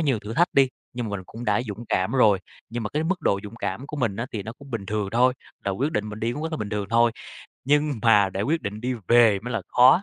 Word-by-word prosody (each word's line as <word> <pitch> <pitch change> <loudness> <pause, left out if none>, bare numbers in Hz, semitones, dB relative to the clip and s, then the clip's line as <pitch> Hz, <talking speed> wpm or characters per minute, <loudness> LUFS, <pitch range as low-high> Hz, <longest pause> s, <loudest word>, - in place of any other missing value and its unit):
nhiều 140 -7 +1
thử 105 +2 -7
thách 170 +4 +2
đi, 135 -1 +5 0.2
nhưng 120 -1 -3
mà - - -5
mình 95 - -9
cũng 115 +2 -8
đã 105 +1 +2
dũng 110 -1 -7
cảm 95 0 +1
rồi. 110 -7 +5 0.3
Nhưng 120 +1 -4
mà 105 - -2
cái 150 - -1
mức 180 +2 0
độ 100 - +1
dũng 105 +2 -9
cảm 115 +3 -4
của 150 - -6
mình 115 -8 0
á 115 +3 -3
thì 105 - -3
nó 110 +3 -6
cũng 140 +2 -15
bình 110 -5 -4
thường 105 0 -1
thôi, 125 +3 +3 0.3
là 100 - 0
quyết 135 +11 -1
định 105 -4 -1
mình 105 +1 -7
đi 115 +1 0
cũng 150 +5 -5
rất 160 - -3
là 155 - -1
bình 105 - -4
thường 105 -1 -2
thôi. 115 0 +4 0.5
Nhưng 145 +2 +3
mà 105 -4 +5
để 95 +2 -2
quyết 160 +5 0
định 105 +1 -4
đi 125 +2 -1
về 115 -4 +6
mới 125 +4 -5
là - - -1
khó. 130 +9 +6
115 Hz, 295 wpm, -25 LUFS, 105-135 Hz, 0.5 s, về